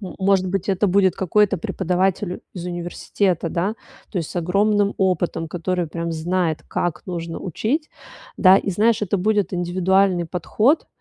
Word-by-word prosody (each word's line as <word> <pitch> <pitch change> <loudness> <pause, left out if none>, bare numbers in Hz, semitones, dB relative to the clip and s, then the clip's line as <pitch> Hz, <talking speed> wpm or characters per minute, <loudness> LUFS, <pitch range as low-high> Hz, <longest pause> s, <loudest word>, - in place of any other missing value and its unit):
Может 190 -1 0
быть, 195 +1 -2
это 195 +2 +2
будет 190 -1 +3
какой-то 195 +1 +2
преподаватель 185 +2 -1
из 175 - -6
университета, 175 0 -1
да. 190 +7 -1 0.4
То 190 - -2
есть 165 - -4
с - - -8
огромным 200 +4 +2
опытом, 175 -3 0
который 175 +1 -2
прям 170 +1 -4
знает, 165 0 -1
как 170 -3 -2
нужно 170 -2 -5
учить, 240 - -2 0.5
да, 185 0 +7
и, 200 - -3
знаешь, 215 +4 +2
это 200 0 0
будет 205 -1 +1
индивидуальный 180 +1 +2
подход. 215 - +1
185 Hz, 145 wpm, -21 LUFS, 175-200 Hz, 0.5 s, да